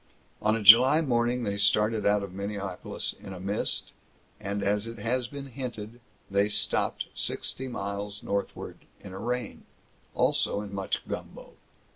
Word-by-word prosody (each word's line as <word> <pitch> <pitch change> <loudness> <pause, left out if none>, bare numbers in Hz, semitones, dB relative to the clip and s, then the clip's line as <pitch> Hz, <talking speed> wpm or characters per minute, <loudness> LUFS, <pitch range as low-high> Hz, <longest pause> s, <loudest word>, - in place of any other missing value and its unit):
On 110 +1 +3
a 115 - -3
July 125 +8 +9
morning, 120 -3 +1
they 100 -2 -1
started 105 +1 +3
out 105 0 +3
of 95 -2 -7
Minneapolis 100 -1 -3
in 95 - -10
a 90 - -8
mist, 100 +3 -1 0.5
and 100 +1 -3
as 105 +2 0
it 115 0 -7
has 120 +3 -1
been 140 +2 -7
hinted, 120 -3 -7 0.3
they 100 +1 +2
stopped - - 0
sixty 130 - -2
miles 100 -3 -5
northward, 100 0 -4 0.2
in 95 - -9
a 95 - -6
rain, 120 0 -3 0.5
also 100 - +2
in 100 -1 -8
much 95 -1 -3
gumbo. - - -7
105 Hz, 150 wpm, -28 LUFS, 100-120 Hz, 0.5 s, July